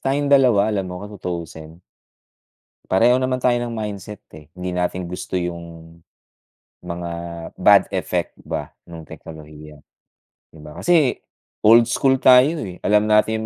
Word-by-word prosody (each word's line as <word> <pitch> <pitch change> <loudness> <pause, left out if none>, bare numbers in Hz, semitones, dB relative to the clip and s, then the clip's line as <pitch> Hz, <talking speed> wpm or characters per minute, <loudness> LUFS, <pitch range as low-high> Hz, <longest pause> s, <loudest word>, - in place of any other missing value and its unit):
tayong 140 +1 -1
dalawa, 125 -7 +4
alam 100 -2 -1
mo 90 0 -7
kung 105 - -11
tutuusin 85 -1 -7 1.1
pareho 120 +7 +3
naman 130 0 -1
tayo 125 -1 +2
ng 120 - -4
mindset, 105 -2 -6 0.2
eh, 75 -1 -14
hindi 90 0 -4
natin 90 0 -2
gusto 90 +1 -4
yung, 85 -1 -8 0.8
mga 85 -1 -6 0.5
bad - - +5
effect - - -3
ba - - -5 0.2
nung 85 -1 -10
teknolohiya, 75 -1 -13 0.7
di 80 - -18
ba? 75 0 -12
Kasi 165 -7 +3 0.5
old 115 +2 +6
school 130 +3 +1
tayo, 130 +6 +5
eh, 90 -1 -10
alam 105 0 +2
natin 110 +1 +2
95 Hz, 140 wpm, -20 LUFS, 85-120 Hz, 1.1 s, old